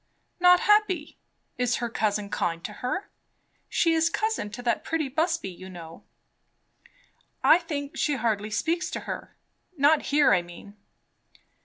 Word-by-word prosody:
"Not 360 0 +6
happy! 405 -7 +2 0.4
Is 245 0 +1
her 240 - -2
cousin 210 -3 -1
kind 170 -1 -2
to - - -6
her? 375 +11 -3 0.6
She 330 -1 +2
is 325 +1 +3
cousin 435 - -1
to 240 +4 -8
that 235 -2 0
pretty 315 -4 -1
Busby, 320 - -1
you 185 +1 -11
know." 165 -3 -10 1.4
"I 330 - +7
think 290 -4 -5
she 295 - 0
hardly 220 -4 -1
speaks 325 +12 -1
to - - -5
her. - - -7 0.4
Not 290 +2 +4
here, 290 -4 +5
I 180 - +3
mean." 175 +4 -13
275 Hz, 145 wpm, -26 LUFS, 210-330 Hz, 1.4 s, I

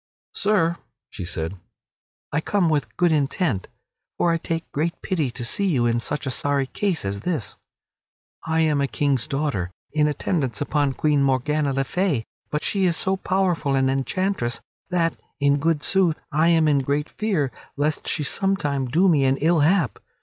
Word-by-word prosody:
"Sir," 180 -5 +2 0.3
she 95 - -6
said, 85 +1 -4 0.7
"I 150 - 0
come 185 -1 +1
with 150 -2 -1
good 175 -1 +3
intent, 145 - 0 0.5
for 170 - +2
I 165 - +2
take 165 0 -4
great 160 +4 -1
pity 160 -8 0
to 120 0 -5
see 200 - +1
you 130 -10 +2
in 120 0 +2
such 145 +5 -3
a 130 - -1
sorry 140 +1 +1
case 180 - -2
as 100 0 -3
this. 155 -5 -2 0.9
I 160 0 +1
am 150 -3 +2
a 140 - +1
King's 140 -4 0
daughter 135 - -1 0.2
in 150 -1 +2
attendance 140 - -1
upon 145 -3 0
Queen 150 0 +2
Morgana 140 +2 +1
le 135 0 0
Fay, 155 - 0 0.2
but 150 - -2
she 195 -2 +1
is 170 -3 +2
so 190 0 +1
powerful 185 -7 0
an 135 0 +2
enchantress 135 -1 -1 0.3
that, 170 -2 +1 0.3
in 140 0 +3
good 160 0 +1
sooth, 185 -5 +2
I 155 +2 +3
am 165 -2 +4
in 145 -2 +4
great 145 +3 -1
fear 185 -12 -1 0.3
lest 150 +1 0
she 155 - +1
some 195 +6 +1
time 140 -5 -1
do 170 +10 +3
me 155 -6 +4
an 135 +1 +2
ill 165 +3 +3
hap. 150 - +2
150 Hz, 180 wpm, -23 LUFS, 135-170 Hz, 0.9 s, am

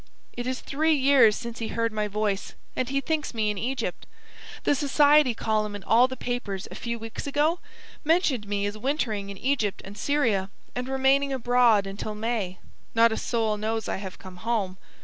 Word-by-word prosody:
It 245 0 -5
is 255 0 -2
three 315 +3 +1
years 260 -6 +5
since 235 -1 -6
he 225 - -2
heard 230 0 -1
my 210 -1 0
voice, 210 -1 -2 0.2
and 255 -1 -1
he 275 +1 0
thinks 300 -3 -2
me 215 -2 +1
in 205 - -5
Egypt. 260 +4 -3 0.6
The - - +3
society 290 -2 +4
column 215 -2 -1
in 205 - -7
all 240 +3 +5
the 260 0 -7
papers, 215 -6 -3
a - - -6
few 235 -1 -4
weeks 225 +4 -6
ago, 300 +5 +1 0.4
mentioned 300 - +2
me 200 0 -1
as 205 +1 -2
wintering 220 -6 -1
in 200 - -7
Egypt 235 -5 0
and 195 +1 -9
Syria 220 -8 +1 0.2
and 250 +1 -4
remaining 270 +1 +3
abroad 245 -5 +4
until 200 +2 -5
May. 210 -4 -2 0.4
Not 230 0 +6
a - - 0
soul 220 -3 0
knows 220 0 -2
I - - -1
have 190 -1 -7
come 185 -1 -11
home. 195 -2 -2
230 Hz, 190 wpm, -26 LUFS, 210-270 Hz, 0.6 s, Not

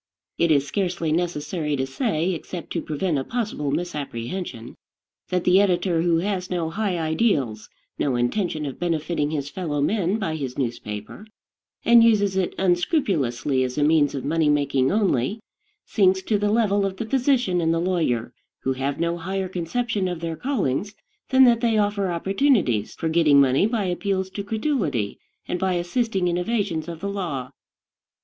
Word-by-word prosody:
It 170 - +3
is 145 -3 +3
scarcely 175 -2 -1
necessary 155 -2 -1
to 130 -1 -1
say, 170 - -1
except 170 +1 -7
to - - -1
prevent 155 0 -1
a - - -2
possible 215 - -3
misapprehension, 140 -4 -4 0.6
that 180 -1 0
the 185 +2 +5
editor 180 -3 +1
who 170 -1 +2
has 185 +1 -2
no 170 -3 -2
high 200 -1 -1
ideals, 155 - 0 0.3
no 135 -3 +1
intention 155 - -1
of 135 - -6
benefiting 160 -3 -1
his 145 -2 -3
fellow 160 -6 -3
men 190 +5 +1
by 165 -7 -2
his 130 -4 -5
newspaper, 115 - -5 0.6
and 235 -1 +7
uses 205 -4 +3
it 190 -2 0
unscrupulously 165 - +1
as 125 +1 -3
a 145 - +2
means 150 -2 +3
of 135 - -4
money 160 0 +2
making 140 -3 +2
only, 200 - +1 0.5
sinks 190 -2 +2
to 210 +1 +1
the 205 0 +1
level 205 -2 +2
of 195 -1 -2
the 230 - -3
physician 245 -7 +1
and 165 0 +2
the 165 - +1
lawyer 160 -10 0 0.3
who 130 - +1
have 135 +2 -3
no 170 +1 -1
higher 190 +2 -2
conception 190 +3 -2
of 175 -2 -3
their 165 -1 -3
callings 205 - -1 0.3
than 265 0 +6
that 235 -2 +5
they 230 -3 +2
offer 205 -2 +1
opportunities 185 - +1
for 165 - -3
getting 160 -3 +4
money 135 +7 +4
by 220 -3 -1
appeals 190 +1 -1
to 200 - -5
credulity, 205 - -1 0.3
and 180 - -2
by 190 0 +1
assisting 190 +2 0
in 175 0 0
evasions 180 -6 -1
of 170 -2 -7
the 200 - -2
law. 165 -10 -4
175 Hz, 170 wpm, -23 LUFS, 145-200 Hz, 0.6 s, and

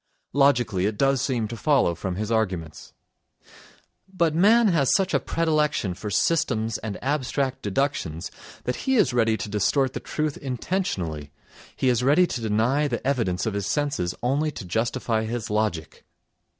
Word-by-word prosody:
Logically 120 -9 +3
it 105 -1 -3
does 135 0 +2
seem 125 -5 -1
to 115 - -6
follow 135 - +2
from 90 +2 -4
his 105 +3 -3
arguments. 90 -9 -2 1.2
But 170 -4 +1
man 215 +7 +5
has 150 -7 +2
such 190 -1 +2
a - - +4
predilection 150 - 0
for 105 +4 -6
systems 115 - +1
and 110 -2 -5
abstract 135 -1 -1
deductions 100 - -2 0.3
that 125 - -2
he 265 - 0
is 175 - +3
ready 115 -2 +2
to 105 - -5
distort 125 +6 +1
the - - -3
truth 155 -1 -3
intentionally, 115 - -3 0.5
he 130 - -1
is 125 -2 +3
ready 145 +8 +4
to 125 - -4
deny 115 +7 +1
the 120 -3 -4
evidence 115 -10 0
of 110 - -1
his 100 -1 -2
senses 140 -8 -1
only 140 +5 +1
to 135 - -8
justify 110 +3 -1
his 115 -1 -4
logic. 105 -7 -2
120 Hz, 160 wpm, -24 LUFS, 105-145 Hz, 1.2 s, man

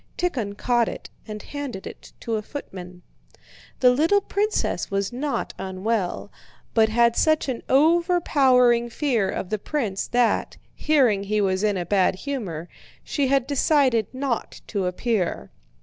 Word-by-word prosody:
Tíkhon 235 - -2
caught 240 -1 +2
it - - -9 0.2
and 210 -1 -7
handed 280 -9 -6
it - - -10
to 230 - -3
a 215 - 0
footman. 180 -8 -9 0.8
The 250 -1 +7
little 320 +10 +3
princess 415 +2 -1
was 200 +3 -2
not 275 +3 -3
unwell, 190 +1 -2 0.4
but 220 -1 +4
had 235 +1 +3
such 310 -2 +2
an 255 -3 -3
overpowering 275 -6 +3
fear 235 -6 0
of 180 - -4
the 215 - -1
prince 215 -7 -2
that, 245 -1 +1 0.2
hearing 250 -10 +2
he 210 +1 0
was 190 -2 +1
in 205 -2 +1
a 175 - -3
bad 190 0 +2
humor, 190 - -5 0.4
she 280 -3 -1
had 270 -1 +2
decided 270 -6 +2
not 260 -2 -3
to 195 -4 -2
appear. 180 - -2
235 Hz, 145 wpm, -24 LUFS, 200-280 Hz, 0.8 s, The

